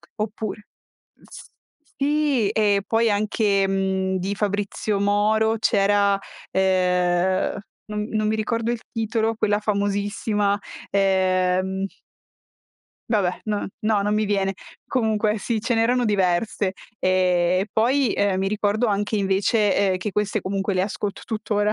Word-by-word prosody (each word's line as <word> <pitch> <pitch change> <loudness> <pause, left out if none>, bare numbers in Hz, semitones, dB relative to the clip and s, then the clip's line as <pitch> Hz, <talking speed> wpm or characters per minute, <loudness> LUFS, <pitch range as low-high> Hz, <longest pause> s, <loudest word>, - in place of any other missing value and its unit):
oppure 215 -1 -5 0.6
s - - -13 0.5
sì! 285 -5 +1
E 205 -2 +2
poi 225 0 +2
anche, 205 -1 +1
mhmm, 190 -1 0
di 190 +2 -2
Fabrizio 205 0 -1
Moro 215 +2 +2
c'era, 200 -1 +3 0.4
uhm, 185 0 +1 0.3
non 210 0 -2
non 215 -1 0
mi 215 - +1
ricordo 230 +1 -1
il 240 -2 -3
titolo, 225 0 -1
quella 205 -1 +1
famosissima, 205 0 0 0.3
ehm 190 0 +1 1.2
vabbè 200 -6 0
no 210 -1 -2
no, 215 -2 +1
non 205 +1 0
mi 215 0 +1
viene. 195 -1 0 0.3
Comunque 220 -3 0
sì, 225 +1 -2
ce 230 +3 0
n'erano 240 +2 +2
diverse, 195 -1 +1 0.3
ehm, 185 -1 +2
e 195 - -2
poi, 250 +2 +2
ehm, 200 -2 +1
mi 195 +1 0
ricordo 210 +3 0
anche 205 0 -1
invece, 200 0 +2
uhm, - - 0
che 210 +3 -4
queste 210 +2 -1
comunque 195 +1 -2
le 185 - +2
ascolto 200 0 -4
tuttora, 210 -1 -1
205 Hz, 130 wpm, -23 LUFS, 195-220 Hz, 1.2 s, c'era